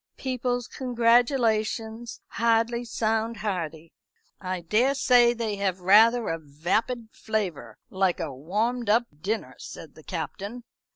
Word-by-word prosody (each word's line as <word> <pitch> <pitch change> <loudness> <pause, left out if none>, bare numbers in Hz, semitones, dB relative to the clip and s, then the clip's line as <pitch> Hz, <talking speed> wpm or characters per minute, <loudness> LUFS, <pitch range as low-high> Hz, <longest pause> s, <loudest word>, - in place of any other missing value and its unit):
People's 245 -2 -2
congratulations 235 -2 +1
hardly 230 +1 +1
sound 225 0 -1
hearty." 170 -6 -4 0.5
"I 185 -1 -4
daresay 240 +4 +4
they 220 -3 -2
have 190 -2 -1
rather 220 +5 +5
a 165 - -2
vapid 190 - -2
flavour, 180 - -3
like 190 -2 +1
a 160 -5 -3
warmed 210 - -2
up 230 +3 +4 0.2
dinner," 215 +6 -2
said - - -10
the - - -15
Captain. 220 +5 -5
220 Hz, 115 wpm, -26 LUFS, 190-240 Hz, 0.5 s, rather